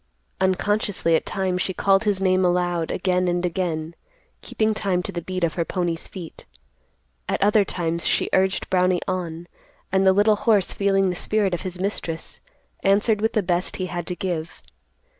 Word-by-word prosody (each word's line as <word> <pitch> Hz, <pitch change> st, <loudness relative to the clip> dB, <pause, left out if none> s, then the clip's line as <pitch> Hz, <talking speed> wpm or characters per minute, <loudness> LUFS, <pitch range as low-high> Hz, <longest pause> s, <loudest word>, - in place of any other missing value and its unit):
Unconsciously, 190 Hz, -1 st, +1 dB
at -, -, -1 dB
times, 185 Hz, -2 st, -1 dB
she 190 Hz, -, -1 dB
called 195 Hz, +4 st, +3 dB
his 205 Hz, -2 st, +1 dB
name 185 Hz, -1 st, +2 dB
aloud 175 Hz, -2 st, +1 dB
again 180 Hz, 0 st, 0 dB
and 175 Hz, 0 st, 0 dB
again, 165 Hz, -2 st, -2 dB, 0.5 s
keeping 220 Hz, 0 st, 0 dB
time 190 Hz, -4 st, -1 dB
to -, -, -4 dB
the 175 Hz, -, -4 dB
beat 185 Hz, +1 st, -4 dB
of 165 Hz, -, +1 dB
her 170 Hz, -, 0 dB
pony's 170 Hz, -1 st, -2 dB
feet. 175 Hz, -4 st, -9 dB, 0.9 s
At -, -, 0 dB
other 210 Hz, +1 st, +4 dB
times 170 Hz, -3 st, -2 dB
she -, -, +1 dB
urged 190 Hz, 0 st, +2 dB
Brownie 180 Hz, -1 st, +2 dB
on, 175 Hz, -3 st, -3 dB, 0.5 s
and 190 Hz, 0 st, +3 dB
the 190 Hz, -, +6 dB
little 205 Hz, +2 st, +4 dB
horse, 205 Hz, -3 st, +2 dB
feeling 195 Hz, -1 st, +2 dB
the -, -, -4 dB
spirit 205 Hz, +1 st, 0 dB
of 175 Hz, -, -2 dB
his 180 Hz, -1 st, -5 dB
mistress, 180 Hz, -4 st, -4 dB, 0.4 s
answered 205 Hz, +2 st, +3 dB
with 220 Hz, -, +1 dB
the 215 Hz, -, +1 dB
best 175 Hz, 0 st, -1 dB
he 185 Hz, -, -3 dB
had 175 Hz, -2 st, -5 dB
to 180 Hz, -, -2 dB
give. 175 Hz, -3 st, -4 dB
185 Hz, 180 wpm, -23 LUFS, 175-195 Hz, 0.9 s, the